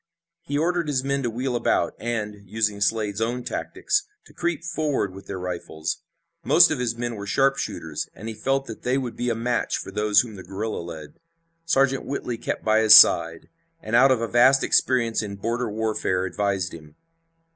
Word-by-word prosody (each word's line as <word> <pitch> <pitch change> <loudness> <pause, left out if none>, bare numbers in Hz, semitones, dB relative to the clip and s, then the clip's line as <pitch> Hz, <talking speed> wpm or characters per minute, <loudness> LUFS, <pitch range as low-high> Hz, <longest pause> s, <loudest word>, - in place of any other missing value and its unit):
He 145 -4 -3
ordered 170 +1 0
his 135 -3 0
men 140 0 -1
to 120 - -1
wheel 125 +2 -3
about, 120 - +1
and, 110 -3 -3 0.2
using 105 -1 -1
Slade's 105 0 0
own 120 +2 -1
tactics, 410 - -2 0.2
to - - -18
creep 170 -2 -2
forward 155 - -2
with 95 0 -12
their 100 - -5
rifles. 85 -3 -4 0.4
Most - - +6
of - - -1
his 120 -2 -2
men 120 0 -3
were 100 -2 -7
sharpshooters 135 +5 -1
and 110 - -9
he 115 - -4
felt 135 +5 -1
that 115 - -9
they 125 +2 0
would 125 -3 -4
be 125 - -2
a 115 - 0
match 120 +1 -1
for - - -7
those 105 0 +3
whom 110 -4 -9
the 95 - -9
guerrilla 100 +4 -4
led. 80 -3 -10 0.5
Sergeant 135 -4 +2
Whitley 125 -4 -4
kept - - -4
by 110 0 +4
his 110 -1 +9
side, - - +5 0.3
and 110 +2 -3
out 130 +3 +6
of 125 -3 +2
a 115 - -1
vast 130 +4 +4
experience 115 -4 +2
in 100 -2 -6
border 115 +4 -2
warfare 105 -4 -1
advised 95 -1 -2
him. 75 -2 -12
115 Hz, 190 wpm, -24 LUFS, 100-130 Hz, 0.5 s, his